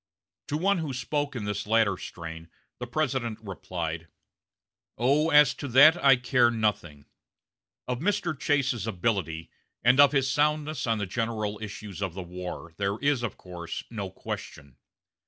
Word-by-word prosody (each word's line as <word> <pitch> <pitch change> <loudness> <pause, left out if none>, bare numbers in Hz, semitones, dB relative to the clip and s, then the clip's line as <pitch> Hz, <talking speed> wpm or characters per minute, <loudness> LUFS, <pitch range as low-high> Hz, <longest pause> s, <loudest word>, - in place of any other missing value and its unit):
To 150 - -1
one 195 +3 +2
who 155 -4 -3
spoke 145 +3 -2
in 110 -4 -4
this 105 0 -3
latter 110 -3 +3
strain 80 -2 -8 0.3
the 125 - -5
President 125 -4 -1
replied: 85 -5 -5 0.9
"Oh, 140 +7 +3
as 150 -3 +6
to 140 - -6
that 140 +6 +6
I 135 -2 +8
care 125 -1 +3
nothing. 105 -10 -2 0.8
Of 125 -1 -2
Mr. 185 -1 0
Chase's 135 -6 0
ability, 90 -6 -2 0.3
and 125 +3 +5
of 145 -1 +8
his 135 -2 +2
soundness 150 0 0
on 115 -1 +2
the 105 - -2
general 110 0 -2
issues 105 -2 -7
of 95 -3 -3
the 95 - -5
war, 90 -2 -7
there 100 +1 -1
is, 140 -1 +1
of 120 -4 -4
course, 90 -2 -7
no 100 -4 -4
question. 70 -6 -8
115 Hz, 155 wpm, -27 LUFS, 95-140 Hz, 0.9 s, I